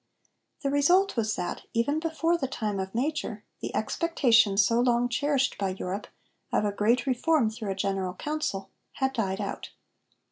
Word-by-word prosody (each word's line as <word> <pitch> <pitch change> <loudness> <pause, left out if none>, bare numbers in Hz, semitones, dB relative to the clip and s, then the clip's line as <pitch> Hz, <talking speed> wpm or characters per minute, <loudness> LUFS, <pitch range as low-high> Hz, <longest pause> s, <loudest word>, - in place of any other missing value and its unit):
The 275 - +1
result 350 +8 +4
was 220 -2 0
that, 175 - -3
even 285 +7 +1
before 330 +1 +1
the 275 -6 -1
time 215 -6 -3
of 190 +1 -4
Major, 300 +6 -2 0.2
the - - -4
expectation, 240 - +3
so 215 +3 +4
long 245 0 +3
cherished 275 0 +1
by 190 -2 -1
Europe, 195 +3 -4 0.4
of - - +2
a 205 - +1
great 230 +5 +2
reform 265 -2 +2
through 220 -2 -5
a 195 - -1
great 190 -2 -2
Council 295 -10 -3 0.2
had 265 0 0
died 195 -5 -1
out. 200 -1 -4
240 Hz, 165 wpm, -28 LUFS, 200-285 Hz, 0.4 s, result